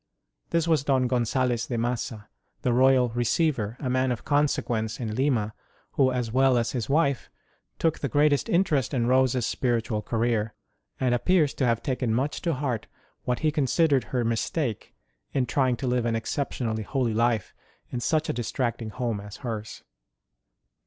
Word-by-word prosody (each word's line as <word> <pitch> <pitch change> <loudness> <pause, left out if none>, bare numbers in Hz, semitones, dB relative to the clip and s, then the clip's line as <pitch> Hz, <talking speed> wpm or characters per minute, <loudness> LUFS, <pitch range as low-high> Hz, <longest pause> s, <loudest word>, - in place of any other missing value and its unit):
This 170 -1 +1
was 160 -5 +3
Don 135 -3 +2
Gonzalez 125 -1 0
de 120 - -2
Massa, 115 -2 -3 0.4
the 125 - +2
Royal 130 0 +4
Receiver, 120 -1 0
a 135 - -3
man 130 0 +1
of 120 - -4
conse 145 0 +2
quence 110 -2 -2
in 110 -4 -3
Lima, 115 -4 0 0.4
who, 130 -1 +3
as 125 -3 -2
well 130 +1 +4
as 115 -1 0
his 120 -3 -3
wife, 140 -3 +1 0.5
took 165 -2 +1
the 140 - -2
greatest 145 +2 +2
interest 155 -7 +1
in 120 -2 +1
Rose 130 +1 +3
s 125 -3 0
spiritual 115 -3 0
career, 115 -1 -1 0.4
and 125 -2 +2
appears 155 +3 +2
to 130 - 0
have 115 -1 +1
taken 125 -3 -1
much 135 +5 -1
to 170 -4 0
heart 130 -5 -2 0.4
what 125 -1 -1
he 155 -1 +2
considered 145 -2 +2
her 125 0 -1
mistake 115 +2 -2 0.4
in 130 -2 +1
trying 130 0 +1
to 135 - -4
live 125 -1 +1
an 115 - 0
excep 135 +5 -2
tionally 110 -3 -3
holy 125 -1 -1
life 115 -2 +1 0.4
in 125 - -2
such 155 +5 +1
a - - -1
distracting 120 -1 -2
home 115 -2 -2
as 105 0 -9
hers. 110 -2 -5
125 Hz, 175 wpm, -26 LUFS, 115-135 Hz, 0.5 s, Royal